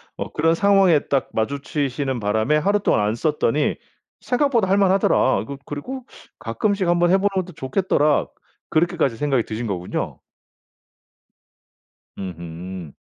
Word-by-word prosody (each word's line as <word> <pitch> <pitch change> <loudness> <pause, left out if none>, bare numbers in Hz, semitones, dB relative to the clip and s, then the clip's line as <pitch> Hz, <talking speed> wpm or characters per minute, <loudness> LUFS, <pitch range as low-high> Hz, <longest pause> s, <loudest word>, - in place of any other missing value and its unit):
어 - - -5
그런 165 +2 +2
상황에 195 -4 +4
딱 135 -2 0
마주치시는 140 +1 -2
바람에 110 +7 +1
하루 200 +7 +2
동안 195 - +2
안 105 +2 0
썼더니 150 +1 +1 0.5
'생각보다 245 -6 +1
할 195 - +4
만하더라.' 195 -8 +3
그 140 0 -7
그리고 250 - -6 0.3
'가끔씩 190 - -1
1 175 0 +2
번 175 0 +3
해 190 - +6
보는 195 +1 +1 0.2
것도 180 - -11
좋겠더라.' 150 +1 +1 0.4
그렇게까지 160 -7 +1
생각이 135 -4 +1
드신 115 +2 -5
거군요. 90 -3 -4 2.0
음음. 85 -2 -7
145 Hz, 295 characters per minute, -22 LUFS, 115-190 Hz, 2.0 s, 해